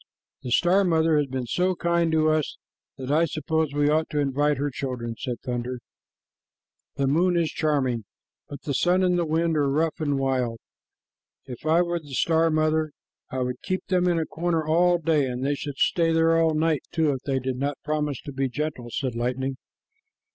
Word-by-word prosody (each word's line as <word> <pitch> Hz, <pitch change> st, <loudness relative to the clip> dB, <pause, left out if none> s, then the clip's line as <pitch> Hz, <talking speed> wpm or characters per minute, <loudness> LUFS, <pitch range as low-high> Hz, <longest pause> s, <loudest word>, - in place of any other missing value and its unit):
"The 125 Hz, -, -6 dB
star 180 Hz, +10 st, +4 dB
mother 165 Hz, -3 st, +3 dB
has 145 Hz, -, 0 dB
been 130 Hz, -1 st, -3 dB
so 180 Hz, +9 st, 0 dB
kind 170 Hz, -1 st, +1 dB
to 155 Hz, 0 st, +3 dB
us 155 Hz, -2 st, -1 dB, 0.4 s
that 130 Hz, 0 st, -4 dB
I 160 Hz, +3 st, +4 dB
suppose 160 Hz, 0 st, -1 dB
we 145 Hz, 0 st, +1 dB
ought 155 Hz, +2 st, +2 dB
to 150 Hz, -, -1 dB
invite 145 Hz, +1 st, +1 dB
her 145 Hz, +1 st, -1 dB
children," 125 Hz, -3 st, -4 dB
said 120 Hz, -1 st, -4 dB
Thunder. 125 Hz, 0 st, -3 dB, 1.2 s
"The 140 Hz, -, 0 dB
moon 170 Hz, +6 st, +2 dB
is 165 Hz, -2 st, +1 dB
charming, 130 Hz, -8 st, 0 dB, 0.4 s
but 145 Hz, -, -9 dB
the 140 Hz, -, -2 dB
sun 180 Hz, +7 st, +2 dB
and 180 Hz, -1 st, +3 dB
the 170 Hz, -2 st, 0 dB
wind 165 Hz, +1 st, +1 dB
are 145 Hz, -2 st, +2 dB
rough 160 Hz, +4 st, 0 dB
and 145 Hz, -3 st, 0 dB
wild. 130 Hz, -4 st, 0 dB, 0.9 s
If 125 Hz, +4 st, -8 dB
I 165 Hz, +3 st, +4 dB
were 175 Hz, 0 st, -2 dB
the 145 Hz, -4 st, -9 dB
star 165 Hz, +2 st, +3 dB
mother, 155 Hz, -1 st, +1 dB, 0.4 s
I 130 Hz, -, -3 dB
would 125 Hz, 0 st, -3 dB
keep 185 Hz, 0 st, -3 dB
them 180 Hz, -1 st, +2 dB
in 175 Hz, -1 st, +2 dB
a 160 Hz, -, 0 dB
corner 165 Hz, -1 st, -1 dB
all 175 Hz, +3 st, +3 dB
day, 160 Hz, -4 st, +1 dB
and 125 Hz, +1 st, -3 dB
they 145 Hz, -, +1 dB
should 145 Hz, -1 st, -5 dB
stay 165 Hz, +2 st, +2 dB
there 165 Hz, 0 st, +3 dB
all 165 Hz, -1 st, +3 dB
night, 155 Hz, -2 st, +1 dB
too, 160 Hz, -3 st, +2 dB
if 135 Hz, -, -2 dB
they 135 Hz, -1 st, +1 dB
did 130 Hz, 0 st, -2 dB
not 140 Hz, +2 st, -2 dB
promise 150 Hz, -3 st, -1 dB
to 145 Hz, -, -7 dB
be 135 Hz, 0 st, -1 dB
gentle," 140 Hz, -3 st, -4 dB
said 130 Hz, +1 st, -2 dB
Lightning. 125 Hz, +3 st, -2 dB
150 Hz, 200 wpm, -25 LUFS, 135-165 Hz, 1.2 s, star